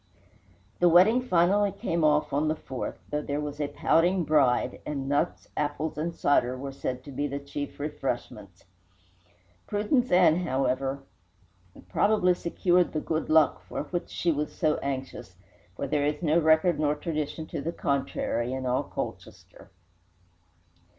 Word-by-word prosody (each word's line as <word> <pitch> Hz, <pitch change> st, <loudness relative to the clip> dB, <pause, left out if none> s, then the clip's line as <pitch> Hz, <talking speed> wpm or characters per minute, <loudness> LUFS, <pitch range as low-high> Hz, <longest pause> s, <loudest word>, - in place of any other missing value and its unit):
The 175 Hz, -, +5 dB
wedding 195 Hz, +9 st, +6 dB
finally 200 Hz, -1 st, +3 dB
came 170 Hz, -4 st, -2 dB
off 150 Hz, -2 st, +2 dB
on 145 Hz, +2 st, +1 dB
the 155 Hz, -, +1 dB
4th, 130 Hz, -4 st, -5 dB, 0.2 s
though 150 Hz, 0 st, 0 dB
there 145 Hz, 0 st, -3 dB
was 150 Hz, 0 st, -5 dB
a 145 Hz, -, 0 dB
pouting 175 Hz, +5 st, +2 dB
bride, 135 Hz, -5 st, +2 dB
and 140 Hz, -2 st, -4 dB
nuts, 145 Hz, +5 st, -1 dB
apples, 150 Hz, +1 st, -2 dB
and 160 Hz, +3 st, -2 dB
cider 130 Hz, -3 st, +2 dB
were 135 Hz, +1 st, -6 dB
said 130 Hz, -1 st, -4 dB
to 140 Hz, -, -10 dB
be 145 Hz, +2 st, -2 dB
the 140 Hz, 0 st, -4 dB
chief 140 Hz, +1 st, -6 dB
refreshments. 120 Hz, -, -5 dB, 1.0 s
Prudence 215 Hz, +5 st, +1 dB
Ann, 180 Hz, -3 st, +5 dB
however, 135 Hz, -3 st, -1 dB, 0.8 s
probably 180 Hz, -, +3 dB
secured 175 Hz, +1 st, +1 dB
the 155 Hz, -, 0 dB
"good 160 Hz, +1 st, -3 dB
luck" 155 Hz, -1 st, +4 dB
for -, -, -3 dB
which 175 Hz, +3 st, -4 dB
she 170 Hz, -, 0 dB
was 150 Hz, 0 st, -2 dB
so 155 Hz, -2 st, +1 dB
anxious, 130 Hz, -7 st, -5 dB, 0.4 s
for -, -, -3 dB
there 145 Hz, +1 st, 0 dB
is 150 Hz, +2 st, -3 dB
no 160 Hz, +1 st, +3 dB
record 160 Hz, 0 st, +3 dB
nor 150 Hz, -1 st, +1 dB
tradition 155 Hz, 0 st, -4 dB
to 155 Hz, -2 st, -5 dB
the 165 Hz, +4 st, -2 dB
contrary 135 Hz, -4 st, -1 dB
in 130 Hz, 0 st, -4 dB
all 125 Hz, 0 st, +1 dB
Colchester. -, -, -8 dB
150 Hz, 150 wpm, -27 LUFS, 140-170 Hz, 1.0 s, wedding